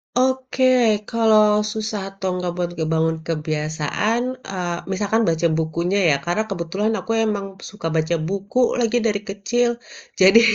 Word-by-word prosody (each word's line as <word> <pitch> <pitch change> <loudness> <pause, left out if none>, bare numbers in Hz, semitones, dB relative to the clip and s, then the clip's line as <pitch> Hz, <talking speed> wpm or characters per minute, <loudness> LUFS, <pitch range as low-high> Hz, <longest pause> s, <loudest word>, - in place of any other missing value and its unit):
Oke, 260 +1 +1 0.5
kalau 220 -2 +4 0.3
susah 215 -1 -3 0.2
atau 190 -1 -4
nggak 180 -1 -2
buat 175 -1 -1
ngebangun 160 0 0
kebiasaan, 155 +7 -1 0.3
eee, 175 -3 -3
misalkan 210 +4 +1
baca 165 +1 +1
bukunya 170 +4 -1
ya, 140 - +4
karena 175 +6 0
kebetulan 195 +4 -2
aku 225 - -5
emang 205 -2 -1 0.2
suka 205 -6 -6
baca 160 +2 +1
buku 200 +6 -2 0.2
lagi 240 0 +2
dari 210 -2 +1
kecil. 230 +5 0 0.5
Jadi, 195 +4 +8
195 Hz, 135 wpm, -21 LUFS, 165-220 Hz, 0.5 s, Jadi